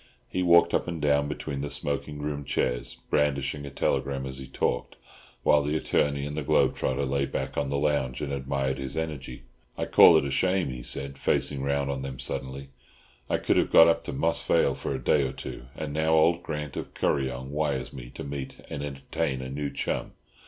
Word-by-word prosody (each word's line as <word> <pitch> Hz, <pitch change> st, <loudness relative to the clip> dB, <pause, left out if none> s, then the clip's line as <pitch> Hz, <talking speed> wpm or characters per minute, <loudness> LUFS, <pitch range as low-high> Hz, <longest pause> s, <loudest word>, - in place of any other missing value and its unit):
He 90 Hz, -, -2 dB
walked 85 Hz, -1 st, +5 dB
up -, -, +1 dB
and 85 Hz, -2 st, -3 dB
down 70 Hz, -1 st, +2 dB
between 75 Hz, -1 st, -4 dB
the 70 Hz, -, -3 dB
smoking 70 Hz, +1 st, -3 dB
room 75 Hz, -1 st, -3 dB
chairs, 65 Hz, -3 st, -1 dB
brandishing 70 Hz, 0 st, +1 dB
a -, -, -5 dB
telegram 70 Hz, 0 st, -1 dB
as 65 Hz, 0 st, -5 dB
he 65 Hz, -, -8 dB
talked, 60 Hz, -, -1 dB, 0.5 s
while 75 Hz, -, +5 dB
the 75 Hz, +2 st, 0 dB
attorney 70 Hz, -2 st, +1 dB
and 75 Hz, 0 st, -5 dB
the 75 Hz, -, -2 dB
globe 70 Hz, -, +3 dB
trotter 70 Hz, -, -1 dB
lay 70 Hz, +1 st, 0 dB
back 65 Hz, 0 st, -3 dB
on 70 Hz, -1 st, -1 dB
the 70 Hz, -, 0 dB
lounge 70 Hz, -3 st, 0 dB
and 70 Hz, -1 st, -3 dB
admired 70 Hz, 0 st, -1 dB
his 65 Hz, +3 st, -4 dB
energy. 70 Hz, -6 st, -4 dB, 0.3 s
"I -, -, -1 dB
call -, -, +8 dB
it -, -, +1 dB
a 70 Hz, -, -2 dB
shame," 95 Hz, +4 st, +1 dB
he 65 Hz, -1 st, -6 dB
said, 70 Hz, +2 st, -3 dB
facing 70 Hz, -2 st, +1 dB
round 70 Hz, 0 st, 0 dB
on 65 Hz, -1 st, -3 dB
them 65 Hz, -1 st, -5 dB
suddenly; 70 Hz, +1 st, -5 dB, 0.6 s
"I -, -, +2 dB
could -, -, +1 dB
have -, -, +3 dB
got 80 Hz, -, +8 dB
up 85 Hz, -, +2 dB
to -, -, -4 dB
Moss -, -, 0 dB
Vale -, -, +3 dB
for 70 Hz, -, -3 dB
a 65 Hz, -, -6 dB
day 75 Hz, -, +4 dB
or 65 Hz, -, -1 dB
two, -, -, -8 dB
and 75 Hz, -2 st, -5 dB
now 80 Hz, +1 st, +2 dB
old 85 Hz, +2 st, +4 dB
Grant 75 Hz, -4 st, -5 dB
of -, -, -6 dB
Kuryong 65 Hz, -1 st, -1 dB
wires 75 Hz, -3 st, -1 dB
me -, -, -8 dB
to -, -, -6 dB
meet 70 Hz, -1 st, -5 dB, 0.2 s
and 70 Hz, -, -4 dB
entertain 70 Hz, 0 st, -3 dB
a 65 Hz, -, -6 dB
new 70 Hz, +1 st, -2 dB
chum. -, -, -3 dB
70 Hz, 210 wpm, -27 LUFS, 65-75 Hz, 0.6 s, call